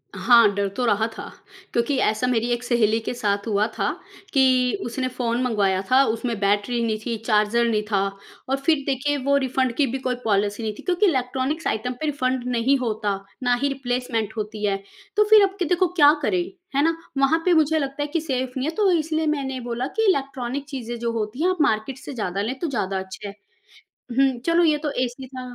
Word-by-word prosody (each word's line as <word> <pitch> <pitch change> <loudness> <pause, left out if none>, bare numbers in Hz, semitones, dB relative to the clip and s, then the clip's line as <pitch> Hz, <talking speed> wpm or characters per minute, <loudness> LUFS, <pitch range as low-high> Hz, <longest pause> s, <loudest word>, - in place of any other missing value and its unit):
हाँ, 235 -3 +6
डर 200 0 0
तो 250 - 0
रहा 220 -1 +2
था, - - -6 0.5
क्योंकि, 240 +4 +1
ऐसा 220 +1 +1
मेरी 240 -1 +1
एक 240 +1 -3
सहेली 230 -3 +2
के - - -2
साथ 205 -3 -1
हुआ 210 -1 +2
था, - - 0 0.5
कि 255 -2 +4
उसने 255 +2 -2
फ़ोन 245 -1 -2
मँगवाया 200 -6 +1
था 265 +1 +6
उसमें 230 -1 -2
बैटरी 205 +4 +1
नहीं 220 -1 0
थी, 235 - -1
चार्जर 215 +1 +2
नहीं 215 -2 +1
था, 195 -2 +3 0.5
और 270 - +1
फिर 310 -3 +3
देखिए, 280 +2 0
वो 280 +1 +2
रिफंड 260 -1 0
की 285 +1 +2
भी 260 +2 -2
कोई 255 -1 -1
पॉलिसी 205 +1 0
नहीं 215 -1 -2
थी, - - -10
क्योँकि 360 +2 +2
इलेक्ट्रॉनिक्स 270 0 0
आइटम 250 +4 -1
पे - - -1
रिफंड 260 -4 -1
नहीं 255 +4 +3
होता, 215 -5 -1 0.2
ना 245 0 +3
ही 280 - +2
रिप्लेसमेंट 245 -5 -2
होती 210 0 -3
है। 200 -1 +1 0.4
तो 420 - +5
फिर 430 -1 +8
अब 385 0 0
के 360 - +1
देखो 355 +3 +2
क्या 290 +1 +8
करें, 355 +4 +1 0.3
है 280 - +3
ना? 330 +1 +2 0.2
वहाँ 275 +4 +3
पे 360 - +4
मुझे 315 -1 +3
लगता 275 0 -3
है - - -3
कि 330 - +1
सेफ 260 -4 -2
नहीं 260 +3 -1
है, 325 - -7
तो 410 -3 +3
इसलिए 320 -1 0
मैंने 270 -3 -1
बोला 240 +2 -2
कि 445 - +3
इलेक्ट्रॉनिक 275 -4 -2
चीज़ें 240 -4 -5
जो 235 0 -1
होती 225 +4 -3
हैं, 365 - +4
आप 370 - 0
मार्केट 220 -1 +1
से 270 - -8
ज़्यादा 200 -5 -2
लें, 240 +6 -3
तो 335 - -2
ज़्यादा 195 -8 -1
अच्छे 190 +2 -8
हैं। 200 - -8 0.8
हुँ, 270 -2 +3
चलो 335 +1 +4
ये 310 -2 +4
तो 300 - -1
एसी 255 +1 -4
था 260 0 -8
255 Hz, 215 wpm, -23 LUFS, 225-280 Hz, 0.8 s, फिर